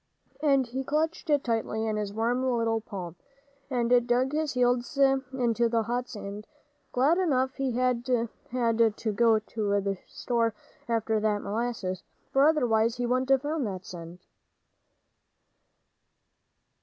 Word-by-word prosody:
And 275 -3 +3
he 260 +3 -4
clutched 310 +4 -1
it 290 -2 +3
tightly 225 -2 -1
in 215 -1 -1
his 210 -1 -2
warm 230 +4 0
little 230 -3 +1
palm, 185 -6 -7 0.5
and 245 -1 +2
dug 250 +2 +2
his 305 -1 -1
heels 245 +2 +1
into 260 -4 +2
the 230 -1 +1
hot 245 +2 -2
sand, 205 0 -7 0.4
glad 290 +8 +3
enough 265 -7 +1
he 270 -3 -1
had 250 0 0 0.4
had 230 -3 +2
to 220 - -2
go 225 +1 +4
to 210 -2 -1
the 195 -1 -2
store 230 -3 -1 0.3
after 220 -1 +1
that 210 -1 0
molasses, 205 -4 -2 0.3
for 275 +2 +5
otherwise 235 -7 +2
he 245 - -1
wouldn't 255 +2 0
have 270 0 +4
found 295 -4 -1
that 185 -2 -6
cent. 170 0 -9
240 Hz, 140 wpm, -28 LUFS, 220-260 Hz, 0.5 s, for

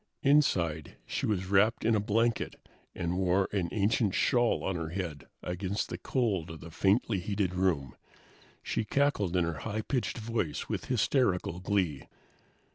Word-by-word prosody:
Inside, 90 - +2
she - - -2
was 95 -3 0
wrapped 100 +5 +3
in 115 - +4
a 110 - +3
blanket 115 +3 0 0.4
and 85 +2 -2
wore 95 +1 +2
an 95 -4 -1
ancient 105 0 +1
shawl 120 -3 +2
on 95 - -1
her 80 -2 -3
head 85 -5 -5 0.2
against 95 +3 -2
the - - -4
cold 100 - 0
of 80 -1 -8
the 85 - -10
faintly 100 +3 +2
heated 100 0 -1
room. 90 -8 0 0.7
She 115 - -1
cackled 105 -7 +1
in 90 - +3
her 85 -1 -3
high 110 0 -3
pitched 125 0 -1
voice 110 -9 -2
with - - -3
hysterical 105 - +1
glee. 90 -7 -1
95 Hz, 155 wpm, -30 LUFS, 90-110 Hz, 0.7 s, in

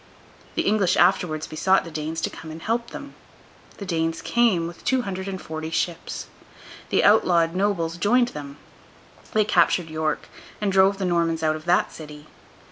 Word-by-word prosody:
The - - +1
English 200 -3 +2
afterwards 175 -3 +2
besought 190 +5 +2
the 165 - -9
Danes 155 +1 -4
to - - -2
come 160 - -10
and 160 +1 -8
help 230 +6 -2
them. 285 0 -9 0.6
The 200 - -7
Danes 165 -2 -1
came, 230 -8 +2
with 170 0 -9
two 260 -1 +1
hundred 190 -2 -5
and 190 -1 -4
forty 160 -1 -6
ships. 165 +1 -3 0.6
The - - +2
outlawed 175 -5 +4
nobles 180 -4 0
joined 240 +6 +3
them; 145 -4 -8 0.8
they 215 -1 +3
captured 175 -3 +2
York, 155 0 -2 0.3
and 205 -2 0
drove 195 +1 +4
the 195 - -2
Normans 165 -2 0
out 155 0 +2
of 155 +1 -9
that 175 +1 +2
city. 150 -1 -10
175 Hz, 170 wpm, -24 LUFS, 160-200 Hz, 0.8 s, outlawed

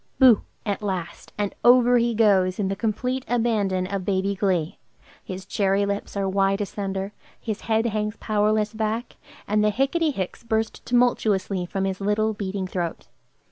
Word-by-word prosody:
"Boo!" 255 -5 +7 0.2
at 205 -1 -2
last, 190 -5 -4
and 205 -1 -1
over 245 0 +6
he 235 0 +1
goes, 190 -4 +3
in 195 -2 -1
the 195 - -1
complete 250 +5 -2
abandon 215 -6 +1
of 195 0 -3
baby 195 +1 0
glee; 185 -5 -1 0.4
his 185 0 -7
cherry 200 0 +1
lips 200 0 -3
are 195 -1 0
wide 195 +1 +1
asunder, 195 -1 -3 0.3
his 220 -3 -4
head 225 0 +1
hangs 215 -1 -1
powerless 215 0 +1
back, 220 +2 -3 0.3
and 210 +1 +2
the 210 - +4
"Hicketty 275 +9 +1
hicks" 190 -9 -4
burst 225 -1 -2
tumultuously 210 -6 +1
from 195 +1 -2
his 190 0 -3
little, 215 +2 +1
beating 195 -2 -3
throat. 175 -2 -4
205 Hz, 160 wpm, -24 LUFS, 195-225 Hz, 0.4 s, Boo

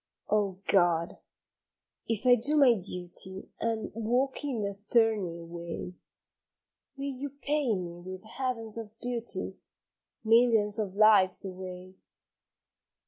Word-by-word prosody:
OH 205 -3 +1
God! 175 -3 +2 0.9
if 225 +1 -2
I 250 - +7
do 255 +6 +5
my 270 -4 +7
duty 185 -1 -1
And 225 -1 -2
walk 245 +6 -1
in 255 -7 -2
the 200 0 -2
thorny 205 -4 0
way, 170 +1 -7 1.0
Will 275 0 -3
you 275 +3 -4
pay 285 -3 -1
me 175 -2 -6
with 185 +2 -9
heavens 230 -1 -4
of 220 0 -10
beauty, 240 -1 -2 0.6
Millions 225 -2 +3
of 200 -3 -3
lives 205 -3 +5
away? 185 0 -8
215 Hz, 115 wpm, -29 LUFS, 185-240 Hz, 1.0 s, I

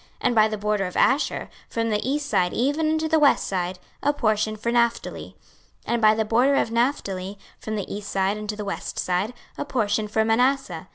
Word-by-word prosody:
26:048:003 - - -29
And 240 - +1
by 215 -1 +6
the 215 0 -3
border 210 -1 0
of 180 - -6
Asher, 270 +3 +2 0.2
from 230 0 -1
the 210 +4 -1
east 295 +1 -1
side 180 -8 +1
even 290 +6 +1
unto 315 0 0
the 320 0 +3
west 290 -2 +4
side, 180 -1 -2 0.2
a 290 - +3
portion 215 -5 0
for 235 +2 -2
Naphtali. 235 -1 -1 0.5
26:048:004 - - 0
And 235 - 0
by 215 0 +6
the 220 0 0
border 245 +6 +3
of 230 - +1
Naphtali, 205 -6 -1 0.2
from 215 - -4
the 200 -1 -4
east 205 -1 -7
side 195 +1 +1
unto 210 0 -4
the 210 -1 -5
west 200 - -5
side, 185 +6 -1 0.3
a - - 0
portion 215 -5 0
for 220 +1 +1
Manasseh. 225 -7 +1
220 Hz, 215 wpm, -24 LUFS, 205-250 Hz, 0.5 s, by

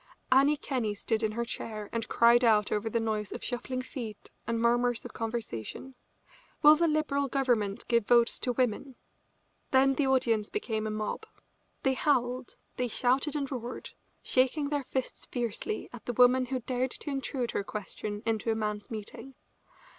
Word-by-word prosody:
Annie 280 +3 +5
Kenney 240 -8 -2
stood 220 +2 -1
up - - +4
in - - -6
her 235 +1 -2
chair 215 -3 -5
and 230 -1 -2
cried 235 +1 +5
out 215 -3 +4
over 215 +1 0
the 230 - 0
noise 215 -2 -2
of - - -6
shuffling 255 +1 -3
feet 230 -6 -7 0.2
and 230 0 0
murmurs 240 +1 +2
of - - -8
conversation: 225 - -5 0.7
"Will 300 +1 +9
the 335 +2 +2
Liberal 300 -3 +1
Government 245 -7 0
give 235 -3 +2
votes 235 -1 +4
to 250 - -1
women?" 250 +2 -1 0.7
Then 270 +1 +4
the 275 0 +1
audience 230 -5 +2
became 220 - -2
a - - -2
mob. 215 - -3 0.6
They 265 - +3
howled, 255 -3 0 0.2
they 250 - 0
shouted 260 +6 +2
and 280 -2 -2
roared, 245 -2 -5 0.3
shaking 270 +3 +2
their 290 -2 -1
fists 260 0 -4
fiercely 235 -3 -3
at 245 - -11
the 245 - -1
woman 250 +2 +5
who 260 0 -2
dared 255 +2 -1
to 290 - -6
intrude 270 -3 -2
her - - -1
question 210 +1 -5
into 225 0 0
a 225 - +2
man's 210 -1 -3
meeting. 230 +4 -7
245 Hz, 170 wpm, -30 LUFS, 220-265 Hz, 0.7 s, Will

